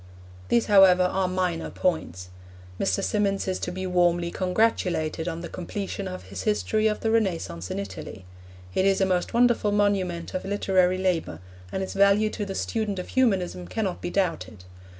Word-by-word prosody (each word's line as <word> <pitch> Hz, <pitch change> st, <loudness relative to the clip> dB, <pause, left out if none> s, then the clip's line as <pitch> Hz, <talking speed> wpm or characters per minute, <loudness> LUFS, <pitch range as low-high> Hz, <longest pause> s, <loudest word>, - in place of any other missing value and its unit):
These, 235 Hz, -, +3 dB
however, 190 Hz, -3 st, +6 dB
are 185 Hz, +1 st, +1 dB
minor 180 Hz, -2 st, -1 dB
points. 90 Hz, -, -2 dB, 0.5 s
Mr. 95 Hz, -, 0 dB
Symonds 200 Hz, -2 st, 0 dB
is 185 Hz, -, -1 dB
to 180 Hz, -, -3 dB
be 185 Hz, +1 st, -5 dB
warmly 175 Hz, -1 st, +2 dB
congratulated 180 Hz, -5 st, 0 dB
on 165 Hz, -1 st, -3 dB
the 170 Hz, -, -5 dB
completion 195 Hz, +2 st, -5 dB
of 185 Hz, 0 st, -7 dB
his 95 Hz, 0 st, -7 dB
history 105 Hz, -, +1 dB
of 210 Hz, -, -1 dB
the 225 Hz, -, 0 dB
Renaissance 165 Hz, -, -1 dB
in -, -, -3 dB
Italy. 95 Hz, -1 st, -7 dB, 0.5 s
It -, -, +1 dB
is 195 Hz, -1 st, +3 dB
a 190 Hz, -, +3 dB
most 185 Hz, +3 st, -1 dB
wonderful 240 Hz, -3 st, +3 dB
monument 195 Hz, -4 st, 0 dB
of 185 Hz, -, -3 dB
literary 190 Hz, -2 st, +2 dB
labour, 180 Hz, -, -1 dB, 0.3 s
and 190 Hz, -, -2 dB
its 190 Hz, -, -5 dB
value 200 Hz, +2 st, +4 dB
to 205 Hz, -2 st, -4 dB
the 195 Hz, -, -5 dB
student 215 Hz, -2 st, -2 dB
of 180 Hz, -, -5 dB
Humanism 185 Hz, -, 0 dB
cannot 195 Hz, -, -3 dB
be -, -, -3 dB
doubted. 170 Hz, -, -2 dB
185 Hz, 170 wpm, -25 LUFS, 170-200 Hz, 0.5 s, however